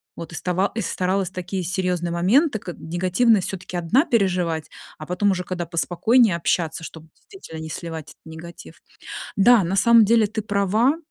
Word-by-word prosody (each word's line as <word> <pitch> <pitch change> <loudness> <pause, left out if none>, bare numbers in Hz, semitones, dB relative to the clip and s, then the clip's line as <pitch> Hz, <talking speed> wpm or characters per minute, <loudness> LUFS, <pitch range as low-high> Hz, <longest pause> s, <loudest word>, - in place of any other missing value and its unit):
Вот 165 0 -8
и - - -8
става 180 +4 -1
и 225 - -1
старалась 185 -1 -1
такие 185 0 -4
серьезные 180 -1 -2
моменты, 215 - +2
как 175 -3 -8
негативность 185 +5 +1
все-таки 185 -1 -7
одна 200 - +2
переживать, 180 - 0 0.3
а 155 - -8
потом 190 +3 +1
уже 180 -1 -2
когда 175 -1 -4
поспокойнее 185 +6 +2
общаться, 165 -1 -1
чтобы 160 0 -10
действительно 385 - -12
не 160 - -7
сливать 160 -1 -7
этот - - -19
негатив. 160 - -11 0.6
Да, 220 +2 +6
на 185 +3 -2
самом 230 +3 +6
деле 225 0 +3
ты 220 +1 -4
права. 210 - +1
185 Hz, 165 wpm, -22 LUFS, 170-210 Hz, 0.6 s, Да